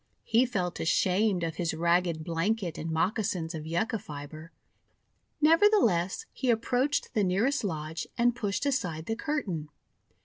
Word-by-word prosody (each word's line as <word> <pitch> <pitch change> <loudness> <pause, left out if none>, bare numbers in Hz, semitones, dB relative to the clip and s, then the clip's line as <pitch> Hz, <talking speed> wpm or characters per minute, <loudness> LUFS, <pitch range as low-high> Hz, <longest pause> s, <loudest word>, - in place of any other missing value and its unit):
He 235 +3 +3
felt 180 -7 -2
ashamed 185 +2 +2
of 165 -1 -3
his 170 -2 -1
ragged 170 -1 +1
blanket 170 +2 -1
and 165 - -4
moccasins 180 0 -1
of 155 -1 -6
Yucca 190 +7 -1
fibre; 155 +1 -9 0.9
nevertheless 325 - +4
he 255 -2 +1
ap 225 -1 +1
proached 265 +4 0
the 215 -4 +2
nearest 220 +10 +1
lodge 160 -3 -4
and 240 0 +3
pushed 210 +2 -2
aside 180 - -1
the 225 - -2
curtain. 210 - -3
185 Hz, 140 wpm, -29 LUFS, 165-235 Hz, 0.9 s, nevertheless